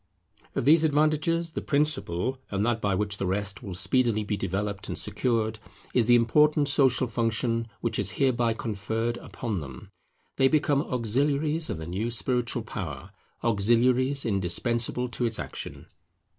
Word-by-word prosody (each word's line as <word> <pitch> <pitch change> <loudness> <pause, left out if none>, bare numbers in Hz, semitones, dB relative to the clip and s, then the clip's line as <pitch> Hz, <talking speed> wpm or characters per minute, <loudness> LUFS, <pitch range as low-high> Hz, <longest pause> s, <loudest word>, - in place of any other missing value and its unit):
Of - - -1
these 155 +3 +6
advantages, 155 +2 +1
the - - -4
principal, 130 - 0
and 100 +1 -1
that 115 -1 0
by 100 -3 +1
which 100 +1 0
the 95 - -2
rest 100 +1 -2
will 100 -6 -6
speedily 115 +1 +1
be 105 0 -2
developed 100 +1 -3
and - - -4
secured, 110 0 -1 0.3
is 120 -3 +2
the 120 - +6
important 145 +5 +4
social 130 -2 +4
function 115 0 -1
which 115 - -1
is 100 -2 +2
hereby 120 -4 +2
conferred 115 +2 -3
upon 110 -6 -5
them. 65 -4 -10 0.5
They 135 - +5
become 145 -1 +2
auxiliaries 145 +6 0
of - - -3
the 80 - -6
new 95 +7 -3
spiritual 120 0 -1
power; 80 -11 -6 0.3
auxiliaries 120 +5 +2
indispensable 115 +5 0
to 120 0 -2
its 115 -1 0
action. - - -7
115 Hz, 150 wpm, -27 LUFS, 105-135 Hz, 0.5 s, these